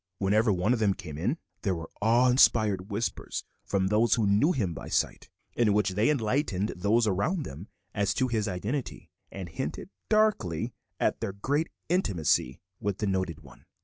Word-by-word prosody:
Whenever 105 +3 +2
one 95 +5 +2
of 120 - 0
them 100 -3 +2
came 80 -5 -8
in, 105 - -1 0.2
there 95 -3 0
were 80 -1 -7
awe 120 +4 +4
inspired 110 -6 +4
whispers 110 +3 -3 0.2
from 95 -1 0
those 110 +3 +3
who 115 - +1
knew 105 - +4
him 100 - -1
by - - -8
sight, - - -1 0.2
in 110 -4 +3
which 105 -1 +2
they 105 +7 +2
enlightened 115 - 0
those 105 +6 +2
around 110 - 0
them 80 - -8 0.3
as 100 -2 0
to 130 -2 +1
his 110 -3 -1
identity, 105 +9 -4 0.2
and 95 -2 -6
hinted 130 - -5 0.2
darkly 215 - +1 0.3
at - - +1
their 100 - -2
great 145 +11 -1 0.2
intimacy 90 - +1 0.2
with 100 -1 -2
the 105 - -2
noted 95 -4 -1
one. - - -16
105 Hz, 175 wpm, -28 LUFS, 95-120 Hz, 0.3 s, awe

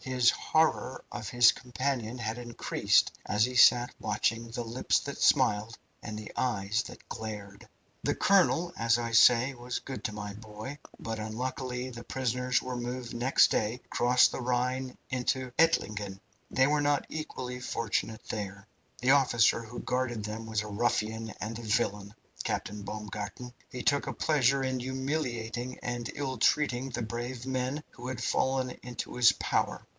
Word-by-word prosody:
His 125 -2 +4
horror 155 -5 +1
of 105 -4 -5
his 120 0 +7
companion 125 -2 -3
had 115 0 -3
increased 120 -1 +2
as 105 +1 +2
he 125 0 -5
sat 120 0 +6
watching 115 +2 0
the 120 +1 -4
lips 115 +2 +1
that - - -6
smiled 105 +2 +3 0.2
and 105 -1 -6
the 105 -1 -7
eyes 105 -3 0
that - - -13
glared. 105 -3 -7 0.3
"The - - 0
colonel, 175 -3 +3
as 115 0 +3
I 120 -1 -3
say, 120 +3 +6
was 120 0 -4
good 135 -1 -7
to - - 0
my 105 -1 -6
boy. 110 +6 -8 0.2
But, 110 -1 -4
unluckily, 125 +3 -3
the 120 -1 -8
prisoners 125 -1 0
were 130 0 -4
moved 120 0 -4
next 125 +3 +4
day 110 +2 +1
across 125 +1 +4
the - - -5
Rhine 125 +1 -1
into 130 0 -1
Ettlingen. 105 -11 +2 0.3
They 130 - +3
were 145 +1 +2
not 145 -1 +2
equally 125 -5 -5
fortunate 115 -2 -2
there. 100 -1 -5 0.4
The 125 +2 +4
officer 120 -5 +4
who 120 +1 -8
guarded 125 -4 -1
them 110 +1 -5
was 110 -1 0
a 105 - -6
ruffian 110 +1 -1
and 110 +2 -4
a - - -8
villain, 105 -2 -1 0.3
Captain 105 +1 -3
Baumgarten. 105 +3 -6 0.2
He 125 -2 -6
took 140 -1 +2
a - - -2
pleasure 135 -3 +2
in 130 -1 -1
humiliating 130 -2 -3
and 120 -1 -3
ill 135 -2 -3
treating 135 -3 +2
the 120 -2 -3
brave 120 +2 -5
men 130 +3 -2
who 120 0 -9
had 130 -1 -4
fallen 130 -1 +1
into 125 -1 -6
his 120 -1 +7
power. - - -1
120 Hz, 160 wpm, -30 LUFS, 110-130 Hz, 0.4 s, his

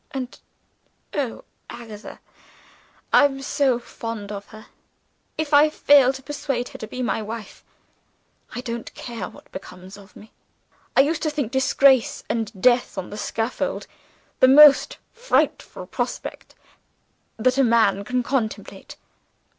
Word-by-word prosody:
And, 265 -4 -6 0.7
oh, 270 -6 -3 0.3
Agatha, 225 -3 -10 0.9
I - - +7
am 270 -1 -2
so 265 -2 +1
fond 230 -3 -7
of 200 -1 -7
her! 215 -1 -13 0.7
If 310 -1 -3
I 295 +2 +7
fail 280 -3 +5
to 265 0 -10
persuade 270 -3 -3
her - - -11
to 220 - -6
be 255 +3 -5
my 225 -1 -1
wife, 215 -1 -8 0.9
I 245 - -4
don't 235 -1 -6
care 235 -2 -6
what - - -17
becomes 185 +1 -10
of 200 0 -17
me. 215 - -15 0.7
I - - +9
used 305 +3 0
to 310 - 0
think 290 -6 -3
disgrace, 265 -1 +3
and 225 -2 -2
death 245 0 +2
on 190 - -5
the - - -6
scaffold, 225 +3 -3 0.5
the 260 - +7
most 285 +1 +7 0.2
frightful - - -1
prospect - - -5 0.8
that 255 +4 +1
a - - +5
man 225 -4 +3
can 250 +3 -1
contemplate. 235 -4 -4
245 Hz, 140 wpm, -23 LUFS, 220-270 Hz, 0.9 s, I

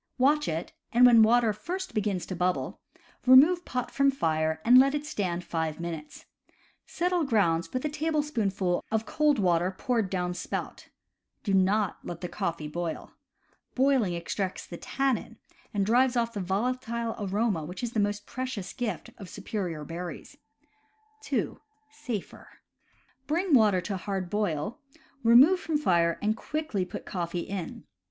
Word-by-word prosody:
Watch 290 +4 +3
it, 160 +1 -3 0.2
and 245 +1 +6
when 235 -2 +8
water 225 0 +4
first 370 - -5
begins 200 -4 -1
to 185 - -5
bubble, 180 +1 -1 0.5
remove 305 +8 +7
pot 250 -1 -3
from 275 0 +3
fire 160 -10 0
and 250 +2 +8
let 275 +2 +4
it 295 0 -3
stand 180 - -2
five 160 -2 -3
minutes. 165 -3 -7 0.6
Settle 355 0 0
grounds 170 - +1
with 255 +3 -3
a - - +1
tablespoonful 275 - -1
of 220 0 0
cold 300 +4 +2
water 175 -2 +2
poured 230 -6 0
down 180 -1 -1
spout. - - -5 0.5
Do 200 - -1
not 195 +1 +2
let 170 -1 -7
the 180 - -3
coffee 165 -3 -3
boil. 170 +1 -5 0.6
Boiling 255 -9 +2
extracts 185 +3 -3
the 175 - -8
tannin, 260 -2 -2 0.3
and 200 -2 0
drives 245 +4 +3
off 230 -1 0
the 205 - -4
volatile 230 +4 -2
aroma 205 -3 0
which 180 +8 -7
is 240 - -2
the 220 - -1
most 205 0 -1
precious 255 -7 -5
gift 230 -9 -4
of 195 - -9
superior 170 -9 -4
berries. 170 - -7 0.9
(2) 275 - -2 0.3
(Safer.) 230 -8 -6 0.8
Bring 340 +3 0
water 210 -7 +5
to 195 +1 -3
hard 190 -1 -4
boil, 205 -2 -1 0.4
remove 260 +11 +7
from 320 -3 -1
fire 170 - +2
and 215 +1 +2
quickly 300 -6 -3
put 180 - -8
coffee 175 -2 -3
in. 190 -3 -6
210 Hz, 150 wpm, -28 LUFS, 180-255 Hz, 0.9 s, when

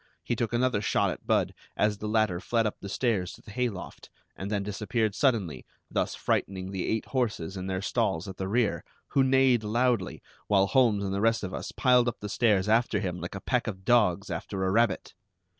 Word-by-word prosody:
He 120 - -1
took 115 0 -1
another 120 -2 +1
shot - - +1
at - - -9
Budd - - +2 0.2
as 105 -1 +1
the 105 - -4
latter 105 -5 +1
fled 115 +4 0
up 105 - -2
the 100 - -7
stairs 100 -5 0
to - - -15
the 105 - -11
hay 125 +2 0
loft, 95 -4 -9 0.3
and 95 - -5
then 105 -2 -1
disappeared 105 +2 -1
suddenly, 105 - 0 0.3
thus - - -1
frightening 95 -1 -1
the 95 -2 -3
eight 110 0 -1
horses 110 -9 -2
in 95 0 -5
their 95 0 -2
stalls 80 0 0
at 95 - -7
the 95 - -3
rear, 110 0 +1 0.3
who 135 - +3
neighed 130 -3 +4
loudly, 115 -2 0 0.2
while 100 -2 +4
Holmes 110 -3 +3
and 95 -1 -2
the 100 - -1
rest 115 -1 +2
of 95 -1 -4
us - - -5
piled 125 -2 +4
up 120 - -2
the 105 - -6
stairs 105 -4 +2
after 110 -1 +2
him, 90 -4 -3
like 90 +2 -6
a 95 - -6
pack 125 -2 0
of 95 -3 -6
dogs 100 -5 +3
after 95 +3 -3
a 95 - +1
rabbit! 115 +3 +1
105 Hz, 215 wpm, -28 LUFS, 95-120 Hz, 0.3 s, neighed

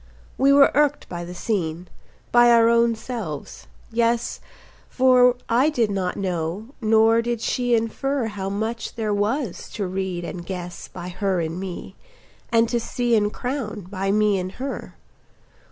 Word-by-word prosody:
We 275 +1 +4
were 280 0 +6
irked 290 0 +2
by 175 -1 -5
the 175 +1 -8
scene, 175 -4 -2 0.4
by 240 0 +6
our 230 -1 +6
own 235 0 +3
selves; 220 - -6 0.2
yes, 235 +1 0 0.5
For 250 -1 +5
I 250 +6 +3
did 235 -8 +1
not 185 -2 -2
know, 185 +3 -3
nor 225 +1 +4
did 235 0 -2
she 245 +1 +1
infer 245 +4 -1
How 200 -3 -4
much 220 +3 -3
there 220 -3 -1
was 210 - -2
to 205 - -2
read 185 -1 -3
and 175 0 -6
guess 175 -1 -6
By 180 0 -8
her 190 0 -1
in 165 +1 -3
me, 185 -2 -7 0.6
and 230 0 +4
to 240 - +1
see 240 0 0
and 210 -1 +2
crown 245 -5 -4
By 195 0 -1
me 210 -1 +3
in 185 0 -3
her. 270 +1 -5
220 Hz, 155 wpm, -23 LUFS, 190-240 Hz, 0.6 s, were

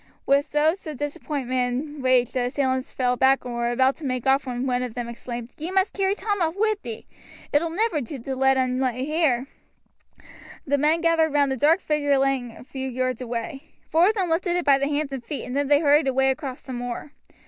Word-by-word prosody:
With 280 +2 +1
oaths 315 +4 +2
of 300 -3 -5
disappointment 265 -3 -2
and 295 -2 -9
rage 255 -2 +3
the 250 -1 -1
assailants 260 0 -1
fell 250 -1 0
back 265 +1 +3
and 245 - -5
were 235 0 -1
about 260 +2 +2
to 325 - -11
make 255 -2 -2
off 270 0 +2
when 250 +1 -3
one 250 -1 0
of 250 -3 -4
them 240 -1 -3
exclaimed: 235 0 -7
"Ye 320 +3 -3
must 380 +1 +1
carry 390 0 +1
Tom 410 -1 -2
off 325 0 0
wi' 435 +1 +3
thee. 230 -3 -7 0.5
It 290 - +4
ull 335 - -2
never 345 -2 0
do 270 +3 -6
to 265 +2 -5
let 265 0 +3
un 255 -1 0
lay 255 -1 -1
here." 300 -5 +1 1.2
The 285 0 +1
men 310 +3 +3
gathered 325 -2 +2
round 285 -2 +3
a - - -2
dark 320 +8 +3
figure 290 -2 +1
lying 270 -2 +1
a - - -12
few 265 +1 -5
yards 255 -1 -2
away. 245 +4 -5 0.3
Four 330 +3 +5
of 435 - +2
them 370 -5 -1
lifted 350 +1 +1
it 355 - -1
by 275 -1 +5
the 275 - 0
hands 290 -1 -1
and 260 -3 -5
feet, 285 +3 -5
and 250 - -5
then 285 0 +1
they 290 +1 +4
hurried 295 -1 +4
away 265 0 +3
across 265 -1 -6
the 260 - -7
moor. 245 +3 -5
270 Hz, 230 wpm, -24 LUFS, 255-310 Hz, 1.2 s, Four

